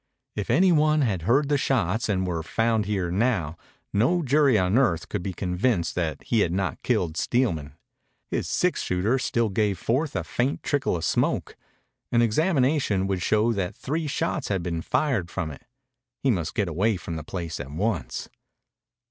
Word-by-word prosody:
If 105 +1 -4
any 180 +10 +5
one 155 -1 +3
had 105 -10 0
heard 140 +4 +4
the 145 -1 +2
shots 110 -5 0
and 95 -2 +1
he - - -2
were 85 -2 -2
found 110 +4 0
here 95 -5 -1
now, 95 -6 0 0.4
no 135 - +2
jury 140 -3 +4
on 95 +1 +2
earth 85 -11 +1
could 105 - -2
be 95 - -3
convinced 90 0 0
that 85 -3 -2
he 115 - +1
had 90 -5 +2
not 95 -3 -2
killed 80 -3 0
Steelman. 80 - 0 0.6
His - - -1
six - - +1
shooter 100 +9 +1
still 115 -3 0
gave 100 -1 0
forth 130 - -1
a - - -1
faint 130 +4 -1
trickle 140 -9 0
of 80 -2 -2
smoke. - - 0 0.6
An 120 0 +4
examination 130 - +2
would 95 -2 -1
show 110 +5 +2
that 95 -3 -2
three 155 +3 -3
shots 160 0 -1
had 95 -4 -1
been 85 -2 -2
fired 115 - 0
from 80 -2 -3
it. 75 - -12 0.6
He 135 - +4
must 85 -6 -2
get 105 - +1
away 95 +6 +1
from 85 -1 -6
the 80 - -5
place 85 -1 -5
at 70 -1 -6
once. 95 +3 -2
105 Hz, 180 wpm, -25 LUFS, 90-130 Hz, 0.6 s, any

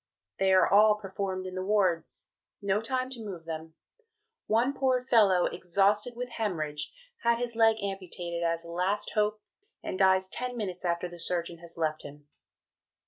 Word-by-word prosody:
They 190 0 +3
are 185 0 +6
all 210 +1 +6
performed 190 -2 -4
in 185 - -6
the 185 0 -3
wards 190 -5 0 0.3
no 200 +1 0
time 255 +2 -1
to 240 -4 -6
move 180 -6 -7
them; 160 0 -6 0.7
one 235 +5 +2
poor 260 -2 +2
fellow 210 -8 +4
exhausted 200 +6 +1
with 250 +1 -5
hæmorrhage, 155 -8 -1 0.4
has 235 0 +3
his 240 -1 -3
leg 225 -1 +5
amputated 180 -3 -4
as 165 0 -1
a 170 - -8
last 185 +4 0
hope, 210 0 +1 0.4
and 185 - -4
dies 190 -1 +4
ten 250 +5 -4
minutes 185 -5 -4
after 170 0 0
the 175 0 -11
Surgeon 170 -1 -2
has 170 0 -11
left 155 -1 -1
him. 145 0 -12
190 Hz, 165 wpm, -29 LUFS, 170-215 Hz, 0.7 s, are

